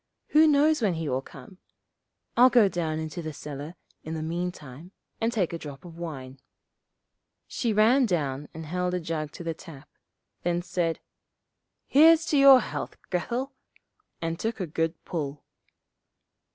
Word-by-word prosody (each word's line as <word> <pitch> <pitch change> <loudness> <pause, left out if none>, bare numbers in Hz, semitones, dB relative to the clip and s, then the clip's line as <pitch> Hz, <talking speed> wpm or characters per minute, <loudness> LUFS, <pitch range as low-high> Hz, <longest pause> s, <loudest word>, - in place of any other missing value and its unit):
Who 310 +1 +6
knows 300 0 +4
when 200 -6 +1
he 160 -1 -3
will 130 -1 -1
come. 135 +7 -14 0.8
I'll 250 +2 +7
go 240 -5 +5
down 165 -4 -2
into 160 +2 -5
the 155 -1 -6
cellar 145 +3 -7 0.3
in 160 +1 -5
the 155 - -4
meantime 170 -1 -5 0.3
and 225 +1 +1
take 195 -8 -1
a 165 - -4
drop 145 +1 -9
of 170 -2 -11
wine.' 135 -6 -7 1.1
She 235 - -2
ran 230 +5 +4
down 145 -6 -2
and 160 0 -8
held 180 +3 -1
a - - -1
jug 155 -3 -4
to - - -8
the 165 -1 -2
tap, 150 -3 -13 0.5
then 175 0 -1
said, 175 -2 -1 0.8
'Here's 325 +3 +6
to 295 - +3
your 275 -2 +9
health, - - -5
Grethel,' 245 +9 -2 0.7
and 165 0 -2
took 225 0 -3
a 185 - -1
good 165 +1 -1
pull. 150 -5 -4
170 Hz, 155 wpm, -27 LUFS, 155-220 Hz, 1.1 s, your